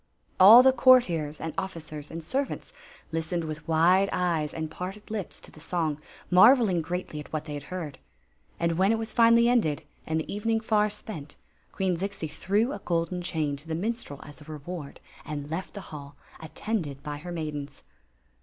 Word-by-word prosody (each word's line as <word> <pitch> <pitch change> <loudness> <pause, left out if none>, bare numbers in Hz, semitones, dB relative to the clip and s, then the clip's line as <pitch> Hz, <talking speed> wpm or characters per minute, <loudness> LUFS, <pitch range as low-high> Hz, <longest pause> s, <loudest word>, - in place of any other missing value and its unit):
All 220 +7 +10
the 265 0 +6
courtiers 175 - +4
and 160 -1 -4
officers 155 -5 -6
and 165 0 -7
servants 270 - -3 0.4
listened 165 +1 -1
with 155 -1 -6
wide 175 +5 +4
eyes 165 -4 0
and 160 -1 -5
parted 190 +5 -7
lips 210 -5 -4
to - - -14
the - - -15
song, 155 -2 -2 0.3
marveling 205 -1 +6
greatly 175 -2 -4
at 150 - -10
what 155 -1 -3
they 150 - -6
had 145 - -5
heard. 160 -7 -5 0.6
And 170 0 0
when 195 +3 +4
it 225 - +2
was 225 0 -4
finally 235 0 +6
ended, 220 -12 +2 0.2
and 160 0 0
the 160 - -5
evening 225 +2 0
far 215 -1 +2
spent, 165 -8 -8 0.4
Queen 185 -3 0
Zixi 195 -2 -4
threw 200 - 0
a 200 - -6
golden 170 0 -1
chain 155 -5 -1
to 145 +3 -9
the 160 - -2
minstrel 200 - -4
as 145 +1 -13
a - - -13
reward 155 0 -7 0.2
and 145 -1 -6
left 180 +6 -4
the 200 - -5
hall, 140 -1 -9 0.2
attended 160 -4 -4
by 150 -1 -5
her 175 +4 -8
maidens. 150 -4 -5
170 Hz, 180 wpm, -27 LUFS, 155-200 Hz, 0.6 s, All